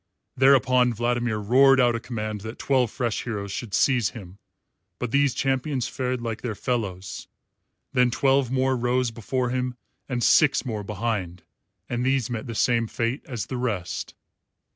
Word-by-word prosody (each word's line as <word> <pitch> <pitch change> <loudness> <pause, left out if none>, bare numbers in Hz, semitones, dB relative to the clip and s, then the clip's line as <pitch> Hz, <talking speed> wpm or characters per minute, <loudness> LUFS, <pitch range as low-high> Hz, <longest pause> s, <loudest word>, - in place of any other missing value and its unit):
Thereupon 130 -2 +4
Vladimir 120 -1 0
roared 130 +6 +5
out 120 -2 +4
a 115 - -2
command 110 -3 -5
that 110 +3 -7
twelve 130 -4 +1
fresh 120 -1 -2
heroes 100 -4 -4
should 105 0 -4
seize 125 -6 +3
him, 95 -1 -11 0.6
but 125 -2 -4
these 140 -2 +2
champions 135 -1 0
fared 125 -1 -3
like 115 -1 -4
their 115 -4 -3
fellows. 100 -7 -3 0.7
Then 125 0 +4
twelve 135 0 +2
more 130 0 +1
rose 125 0 0
before 120 +3 -2
him 125 0 -2 0.3
and 120 -2 -1
six 150 -3 +4
more 110 -4 -3
behind; 100 -4 -3 0.4
and 120 0 -2
these 130 -2 +1
met 120 +3 -4
the 115 - -5
same 115 0 +2
fate 115 +4 -2
as 115 -6 -4
the 130 - -5
rest. 105 -9 -3
120 Hz, 160 wpm, -25 LUFS, 110-130 Hz, 0.7 s, roared